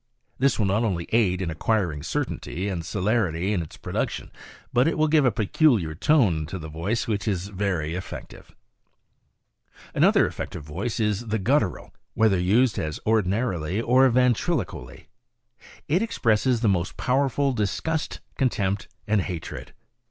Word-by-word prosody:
This 135 +2 +3
will 110 - +1
not 100 +4 +1
only 90 -7 -1
aid 95 -5 +2
in 85 - -2
acquiring 85 -2 0
certainty 85 +4 -3
and 90 -4 -3
celerity 100 -1 0
in 90 - 0
its 80 - -9
production, - - -3 0.4
but 125 +4 +4
it 165 - 0
will 155 0 +3
give 150 -2 +4
a 125 - +4
peculiar 110 - +2
tone 90 - +2
to 95 - -5
the 80 -3 -7
voice 85 +9 -2
which 105 -1 -2
is 95 -2 -1
very 90 -6 -2
effective. 90 +1 -8 1.4
Another - - +4
effective - - -5
voice 90 +11 -4
is 105 +1 0
the 110 +1 0
guttural, 110 - 0 0.2
whether 110 -4 +3
used 105 +6 +3
as 75 -1 -3
ordina 110 +2 +2
rily 90 0 -2
or 130 +3 +4
ventriloquially. 120 - 0 0.8
It 170 +6 +2
expresses 120 - +1
the 115 - +2
most 90 -3 0
powerful 135 +1 +1
disgust, 125 +9 -2
contempt 100 - 0 0.2
and 105 -1 +2
hatred. 90 -3 -6
105 Hz, 145 wpm, -25 LUFS, 90-120 Hz, 1.4 s, but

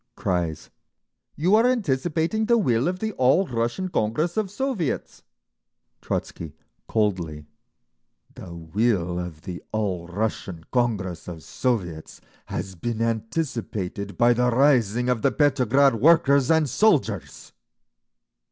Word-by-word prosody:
Cries, 85 -4 -2 0.6
"You 175 +6 +1
are 225 +3 +5
anticipating 175 - 0
the 235 0 +4
will 125 - +1
of 180 +1 -1
the 220 +3 -3
All 135 +10 +4
Russian 120 +7 -2
Congress 155 +4 -1
of 215 -3 -1
Soviets!" 210 - -3 0.8
Trotzky, 80 -3 -4 0.3
coldly, 90 -9 -1 0.9
"The 90 - -10
will 90 +1 -1
of 85 -4 -7
the 90 -2 -6
All 95 -6 -2
Russian 95 -3 -3
Congress 105 -9 -1
of 80 -3 -8
Soviets 90 -11 -3 0.3
has 95 - -5
been 110 +6 -4
anticipated 110 - -3
by 120 0 +5
the 125 +1 +2
rising 125 -3 +3
of 125 -3 +1
the 135 - +2
Petrograd 135 -1 +3
workers 140 +1 +4
and 160 -2 +3
soldiers!" 130 - 0
120 Hz, 115 wpm, -24 LUFS, 95-150 Hz, 0.9 s, are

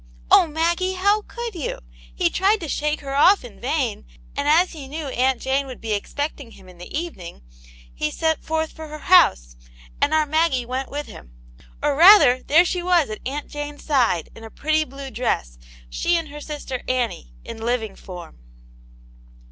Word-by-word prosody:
Oh, - - +7
Maggie, 340 +4 0
how 405 +3 +2
could 475 -2 -6
yotf;? 335 -7 -4 0.4
He 170 - +1
tried 400 +4 +2
to 325 - -4
shake 300 +1 -1
her 275 -1 -6
off 330 +4 +5
in 225 -5 -13
vain, 255 -3 -1 0.3
and 285 - -2
as 335 +5 +4
he 295 -5 -9
Jcnel&yr 290 -1 -5
Aunt 255 0 +2
Jane 270 +1 -1
would 255 - -9
be 225 -1 -3
expecting 285 +5 -4
him 190 - -16
in 180 -1 -16
the 175 - -10
eveniog, 240 - -6 0.5
he 105 - -2
set 320 - -1
forth 320 0 -2
for 315 -1 -9
her 305 0 -8
house, - - +4 0.5
and 290 - +3
our 310 -1 +3
Maggie 305 -4 +1
went 260 +2 -4
with 290 +1 -4
him. - - -13 0.5
Or 290 -1 +2
rather, 330 -7 +7
there 330 +5 +4
she 360 0 -1
was 345 -8 +2
at 215 - -6
Aunt 290 +2 -4
Jane*s 295 0 -7
side, 240 - +1
in 225 - -12
a 225 - -9
pretty 310 +5 0
blue 275 -1 -9
dress; - - -2 0.3
she 340 - 0
and 325 -2 -4
her 295 +1 -9
sister 290 -4 -6
Annie, 230 - -2
in - - -8
living 225 -3 -2
form. 175 - -11
285 Hz, 185 wpm, -22 LUFS, 240-320 Hz, 0.5 s, Oh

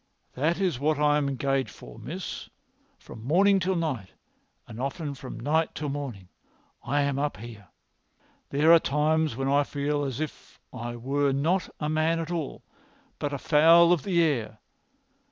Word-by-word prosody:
"That 160 +7 0
is 180 -10 0
what 150 +1 +1
I 150 0 +3
am 140 -1 -1
engaged 135 0 -1
for, 110 - -12
miss. 160 - -6 0.5
From 110 - -12
morning 195 +9 +4
to 185 +1 0
night, 140 - -3 0.5
and 115 0 -8
often 145 +2 -3
from 135 -1 -8
night 160 +3 0
to 150 - -3
morning, 135 -10 -5 0.6
I 145 +4 +1
am 140 -1 -1
up 145 -4 -1
here. 110 -3 -11 0.8
There 150 +4 +5
are 170 - +8
times 155 -1 +1
when 135 +2 -2
I 140 +1 +4
feel 145 +1 -2
as 135 -2 -3
if 155 -2 -7
I 120 -1 -5
were 140 +4 0
not 165 +7 0
a 150 - -2
man 155 +2 +1
at 165 +1 -4
all, 165 -5 -4 0.6
but 145 -2 -2
a 140 - -2
fowl 165 +4 +6
of 170 - 0
the 170 -1 +2
air. 115 -9 -1
145 Hz, 170 wpm, -27 LUFS, 135-160 Hz, 0.8 s, are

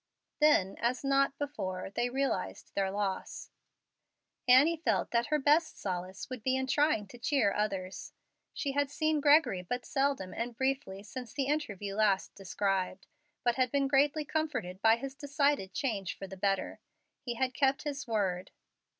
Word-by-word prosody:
Then, 295 -11 +4
as 245 +3 0
not 275 0 +2
before, 190 -11 -4
they 240 +4 0
realized 270 +2 -2
their 195 -1 0
loss. 195 -1 -3 1.0
Annie 295 +6 +6
felt - - +1
that 235 0 +1
her 305 - +2
best 300 +3 +3
solace 185 0 -4
would 255 -3 -6
be 260 +4 +1
in 265 0 0
trying 290 -4 +2
to 245 - -12
cheer 235 -4 +2
others. 195 -3 -3 0.4
She 280 - -2
had 285 0 0
seen 310 +1 0
Gregory 290 - +5
but 245 +8 -4
seldom 270 -9 0
and 235 0 -4
briefly 265 -7 -1
since 240 +2 -8
the 275 - 0
interview 210 -9 -2
last 200 -2 +1
described, 195 0 -2 0.4
but 240 -1 +2
had 255 -1 +2
been 280 -1 +2
greatly 285 +2 +2
comforted 285 - -2
by 225 0 +6
his 265 +3 -6
decided 285 -7 0
change 200 -4 -2
for - - -6
the 190 - -9
better. 195 0 -1 0.4
He 240 -2 -4
had 255 +1 0
kept 275 +2 +1
his 290 -2 -4
word. 190 -5 -1
250 Hz, 160 wpm, -31 LUFS, 195-280 Hz, 1.0 s, Annie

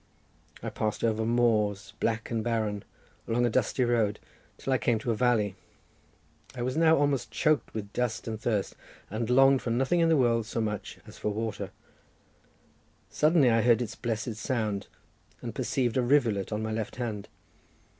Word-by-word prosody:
I - - -3
passed 110 -1 -2
over 110 -1 +1
moors, 110 -4 +1
black 115 0 -1
and 115 -1 -1
barren, 110 -3 -1 0.4
along 120 +2 +2
a 120 - +1
dusty 130 +2 +1
road 115 -4 +1 0.4
till 135 - -1
I 130 - +2
came 120 - +2
to 115 +2 -2
a - - 0
valley; 110 -4 +2 1.0
I 120 - -3
was 130 +1 -2
now 160 0 +5
almost 145 -2 +1
choked 155 -6 +1
with 100 -2 -5
dust 120 -3 -2
and 110 -1 -4
thirst, 110 -4 -1 0.4
and 110 +2 -2
longed 135 +1 +5
for - - -3
nothing 130 +9 +2
in 165 -1 +4
the 160 - +4
world 115 -4 +2
so 115 - -3
much 105 -2 -3
as - - -13
for - - -1
water; 105 -2 -3 1.4
suddenly 150 -5 +4
I 115 0 +4
heard 120 0 +4
its 120 -4 -3
blessed 115 -2 -3
sound, 110 -5 -2 0.5
and - - -6
perceived 125 -4 -1
a - - +4
rivulet 120 -7 +2
on 105 +1 -2
my 110 - -2
left 110 -1 -3
hand. 110 -5 -4
115 Hz, 175 wpm, -28 LUFS, 110-125 Hz, 1.4 s, now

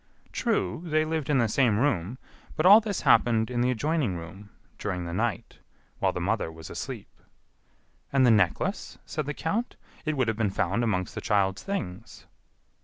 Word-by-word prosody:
"True, 225 -8 -1
they 155 -2 +1
lived 155 -3 -2
in 145 - +3
the 120 -3 +3
same 110 -1 +2
room, 115 -4 0 0.4
but 155 - 0
all 205 +4 +9
this 210 -3 -3
happened 115 0 +3
in 120 -1 0
the 125 - +2
adjoining 130 - 0
room, 95 +5 -10 0.3
during 90 -4 -3
the 85 - -5
night, 110 +1 -2 0.4
while - - +2
the - - -4
mother 95 -1 -1
was 80 0 -10
asleep." - - -7 0.9
"And 135 -2 +4
the 120 - +6
necklace?" 100 -6 +1
said 150 -2 -4
the 150 - -3
count. 215 +9 -2 0.3
"It 155 -1 -2
would 130 -3 +1
have 110 -1 -1
been 110 -3 +1
found 95 +4 0
amongst 95 -5 -1
the - - -5
child's 100 -1 +1
things." 115 - -6
115 Hz, 180 wpm, -27 LUFS, 95-150 Hz, 0.9 s, all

